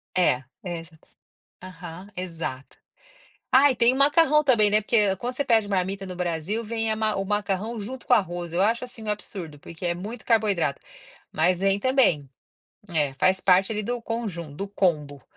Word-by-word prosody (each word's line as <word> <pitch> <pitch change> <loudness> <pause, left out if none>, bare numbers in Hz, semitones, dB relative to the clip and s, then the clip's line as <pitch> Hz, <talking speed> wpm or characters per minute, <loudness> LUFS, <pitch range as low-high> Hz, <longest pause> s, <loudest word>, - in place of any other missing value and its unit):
É, 140 -8 +2 0.2
exato, 165 -2 -8 0.6
aham, 180 +1 -9
exato, 165 -7 -5 0.7
ah, 270 +2 +6
e - - -3
tem 235 +2 +4
o - - -3
macarrão 300 +1 +4
também, 225 -7 +4
né, 210 +1 +3
porque 205 -3 +2
quando 245 +6 -4
você 280 +2 -2
pede 220 -4 +3
marmita 195 0 -1
no 180 -1 -7
Brasil 180 +6 -2
vem 225 0 -1
a - - 0
ma 215 -1 0
o 195 - -1
macarrão 205 +2 -2
junto 250 +5 -7
com 250 - +3
o - - +8
arroz, 175 -3 -3
eu 175 - 0
acho 230 +5 +2
assim 245 -2 -9
um - - -8
absurdo, 185 -7 -5
porque 170 +4 -9
é 170 0 0
muito 215 +6 -7
carboidrato, 205 - +1 0.5
mas 180 0 +1
vem 195 0 +2
também, 200 - +2 0.6
é, 150 -5 0
faz 185 +7 +2
parte 190 +2 +4
ali 215 0 -1
do 240 +3 -3
conjun 200 -10 -5
do 200 - -4
combo. 150 -8 -1
195 Hz, 185 wpm, -25 LUFS, 175-230 Hz, 0.7 s, o